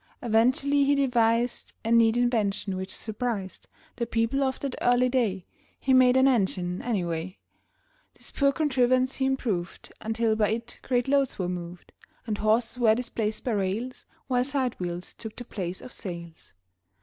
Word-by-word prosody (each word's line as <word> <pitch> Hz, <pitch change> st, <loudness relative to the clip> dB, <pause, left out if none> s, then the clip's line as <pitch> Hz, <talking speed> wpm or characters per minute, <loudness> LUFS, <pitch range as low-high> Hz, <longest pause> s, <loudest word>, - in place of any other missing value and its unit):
Eventually 260 Hz, +5 st, +3 dB
he 285 Hz, +1 st, +3 dB
devised 240 Hz, -3 st, +1 dB
A 225 Hz, -, 0 dB
neat 230 Hz, 0 st, +5 dB
invention 215 Hz, -5 st, 0 dB
which 190 Hz, +1 st, -5 dB
surprised 220 Hz, -3 st, -4 dB, 0.3 s
The 235 Hz, -1 st, -2 dB
people 230 Hz, +5 st, 0 dB
of 265 Hz, -1 st, 0 dB
that 275 Hz, -2 st, -3 dB
early 245 Hz, +1 st, +3 dB
day 220 Hz, -8 st, 0 dB, 0.3 s
He 265 Hz, -, +1 dB
made 255 Hz, 0 st, +6 dB
an 260 Hz, +1 st, +5 dB
engine, 190 Hz, -7 st, 0 dB
anyway. 180 Hz, -5 st, -2 dB, 0.8 s
This -, -, -11 dB
poor 280 Hz, -1 st, +3 dB
contrivance 255 Hz, -3 st, +2 dB
he 265 Hz, -, +1 dB
improved 215 Hz, -10 st, -3 dB
Until 225 Hz, 0 st, 0 dB
by 215 Hz, -1 st, +2 dB
it 235 Hz, +1 st, -6 dB
great 245 Hz, -1 st, 0 dB
loads 275 Hz, -1 st, +2 dB
were 185 Hz, -, -1 dB
moved 175 Hz, 0 st, -7 dB, 0.3 s
And 215 Hz, -3 st, -3 dB
horses 225 Hz, +3 st, +1 dB
were 220 Hz, -3 st, +5 dB
displaced 220 Hz, -3 st, -2 dB
by 250 Hz, -, -1 dB
rails, 210 Hz, +5 st, -2 dB, 0.2 s
While 250 Hz, -2 st, +1 dB
sidewheels 240 Hz, -11 st, -3 dB
took 220 Hz, -1 st, -9 dB
the 245 Hz, -, -8 dB
place 185 Hz, -5 st, -5 dB
of 255 Hz, -, -10 dB
sails. 170 Hz, -4 st, -8 dB
230 Hz, 155 wpm, -27 LUFS, 200-255 Hz, 0.8 s, made